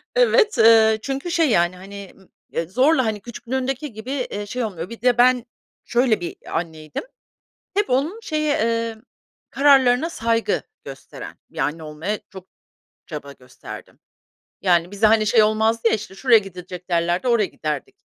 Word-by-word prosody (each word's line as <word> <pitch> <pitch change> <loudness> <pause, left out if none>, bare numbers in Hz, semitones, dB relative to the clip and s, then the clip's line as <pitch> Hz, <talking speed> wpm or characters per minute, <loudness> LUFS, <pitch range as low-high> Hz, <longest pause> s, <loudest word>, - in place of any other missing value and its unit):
Evet. 480 - +4
Eee, 220 -1 +6
çünkü 275 +7 -4
şey, 330 -4 +2
yani, 175 -3 +2
hani, 200 +1 -10
m 190 - -21 0.3
eee, 165 -1 -2
zorla, 260 - +3
hani, 215 -2 -2
küçüklüğündeki 255 +3 -4
gibi, 220 +5 -7
eee, 245 -7 -3
şey 245 +4 -3
olmuyor. 185 -3 -5
Bir 230 - -10
de 245 -1 +3
ben 250 0 +4 0.4
şöyle 240 -3 +2
bir 175 - -5 0.2
anneydim; 160 - -7 0.7
hep 410 +1 +1
onun 295 - 0
şeye, 305 -7 -1
eee, 230 0 -1 0.5
kararlarına 270 +1 +4
saygı 230 -6 0 0.2
gösteren 135 -1 -10
bir - - -18
anne 160 +2 -1
olmaya 160 +8 -4
çok 190 -1 -12 0.6
çaba 145 -3 -7
gösterdim. 125 -2 -12 0.6
Yani, 175 -1 +2
bize, 205 +2 +2
hani, 215 0 +4
şey 220 0 +5
olmazdı 220 +2 +2
ya, - - +2
"İşte, 210 -2 -6
şuraya 235 +2 +5
gidilecek." 180 -2 -9
derlerdi, 175 +6 +1
oraya 230 -4 +3
giderdik. 180 - -5
220 Hz, 155 wpm, -22 LUFS, 185-255 Hz, 0.7 s, Eee